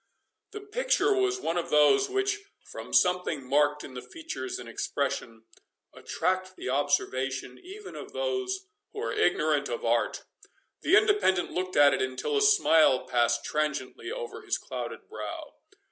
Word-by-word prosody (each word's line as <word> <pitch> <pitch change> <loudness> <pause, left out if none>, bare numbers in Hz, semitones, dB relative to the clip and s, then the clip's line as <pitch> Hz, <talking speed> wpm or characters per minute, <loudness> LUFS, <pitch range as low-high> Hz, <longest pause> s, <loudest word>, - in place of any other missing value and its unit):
The 420 - -8
picture 430 +1 +1
was 385 0 +1
one 170 - -1
of 170 - -5
those 150 - +4
which, 395 +1 0 0.3
from - - -8
something 180 -7 +2
marked 145 +2 +2
in 130 - -9
the 125 - -6
features 330 - -6
and 375 - -9
expression, 115 -1 -3 0.5
attract 185 0 -2
the - - -5
observation 135 -2 -1
even 400 +3 -10
of - - -8
those 390 -6 -2 0.3
who 415 - -6
are - - -2
ignorant - - +1
of - - -4
art. - - 0 0.6
The 395 - +5
Independent 410 - +2
looked 185 +1 -3
at 145 -1 +6
it - - 0
until 130 - -2
a 420 - +2
smile 165 - +5
passed 120 -2 +1
transiently 150 - -2
over 465 -3 -6
his 405 -3 -1
clouded - - -7
brow. - - -7
185 Hz, 150 wpm, -28 LUFS, -, 0.6 s, at